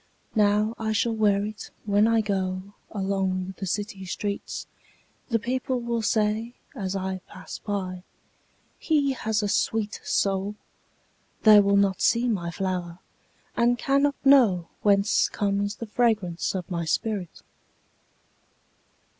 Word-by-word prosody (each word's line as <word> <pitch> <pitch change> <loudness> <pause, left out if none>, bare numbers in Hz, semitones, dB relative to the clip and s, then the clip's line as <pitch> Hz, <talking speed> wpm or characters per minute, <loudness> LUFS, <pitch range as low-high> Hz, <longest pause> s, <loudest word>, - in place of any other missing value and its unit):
Now 210 0 +3
I 220 -1 -1
shall 225 +2 +1
wear 205 -2 +3
itWhen 210 0 -1
I 225 -1 +3
goAlong 190 -1 -2
the 195 - -4
city 200 0 -3
streets:The 200 +4 -5
people 255 +3 -2
will 235 -1 -2
sayAs 215 -1 -2
I 190 0 -3
pass 185 - -9
by—"He 205 - -4
has 220 -3 -1
a - - +1
sweet 215 +1 0
soul!"They 205 +2 0
will 200 0 +4
not 195 -2 +2
see 235 +2 +3
my 190 -7 -1
flower, 180 -1 -3 0.6
And 240 +1 +3
cannot 280 +2 +2
knowWhence 205 -5 +4
comes 205 0 -1
the 230 - -6
fragrance 210 -7 0
of 185 -1 -5
my 170 -1 -1
spirit! 190 +2 -2
205 Hz, 105 wpm, -26 LUFS, 190-225 Hz, 0.6 s, will